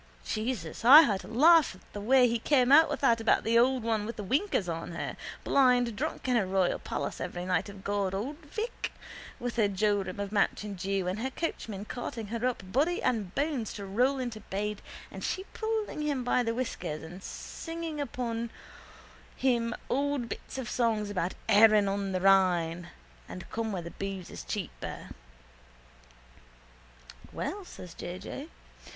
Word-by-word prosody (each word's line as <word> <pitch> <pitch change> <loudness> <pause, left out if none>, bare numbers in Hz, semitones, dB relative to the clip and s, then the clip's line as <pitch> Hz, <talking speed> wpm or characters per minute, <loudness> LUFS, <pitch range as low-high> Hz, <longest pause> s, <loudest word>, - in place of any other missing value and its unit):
Jesus, 215 -6 -3
I 275 +7 +11
had 210 -11 +1
to - - -11
laugh 305 - +5
at 185 - -21
the 205 - -5
way 250 +3 +5
he 235 0 0
came 255 0 +3
out 315 +3 +8
with - - -3
that 230 -4 +4
about 225 - +3
the 230 +1 +4
old 255 0 +3
one 220 -2 0
with 230 - -5
the 210 - -5
winkers 260 - 0
on 165 0 -4
her, 170 - -4 0.3
blind 245 -4 +3
drunk 215 - -3
in 250 - +2
her 210 -5 +2
royal 185 -1 +1
palace - - -4
every 180 0 -4
night 180 +2 0
of 200 -1 -11
God, 200 -2 -1
old 260 +10 -3
Vic, 385 +10 -5 0.5
with 245 0 -4
her 215 -3 +4
jorum 200 -1 0
of 200 -1 -3
mountain 205 0 0
dew 195 0 -2
and 185 +3 -2
her 260 +3 -1
coachman 220 - -4
carting 235 -1 -5
her 230 +1 -4
up 245 -6 -3
body 315 - +2
and 210 -7 -1
bones 280 -6 -1
to 200 - -6
roll 250 +8 +2
into 240 -4 -4
bed 210 0 -4 0.3
and - - -8
she 380 - -2
pulling 440 -7 -2
him 290 -4 -1
by 245 +1 +2
the 230 -1 -1
whiskers 180 -11 -3
and 175 +4 -9
singing 330 - -6 1.4
him 235 -3 +1
old 280 -2 0
bits - - -7
of 260 -3 -4
songs 215 -2 0
about 180 -2 -2
Ehren 210 -1 +6
on 195 0 -1
the 185 -1 -1
Rhine 175 -3 +3 0.4
and 180 - -8
come 225 -1 -2
where 185 -4 -3
the 170 - -7
boose 195 -2 -5
is - - -7
cheaper. - - -6 2.2
—Well, 405 +1 -4
says 180 - -10
J. 175 +1 -6
J. 275 - -7
220 Hz, 170 wpm, -29 LUFS, 195-255 Hz, 2.2 s, I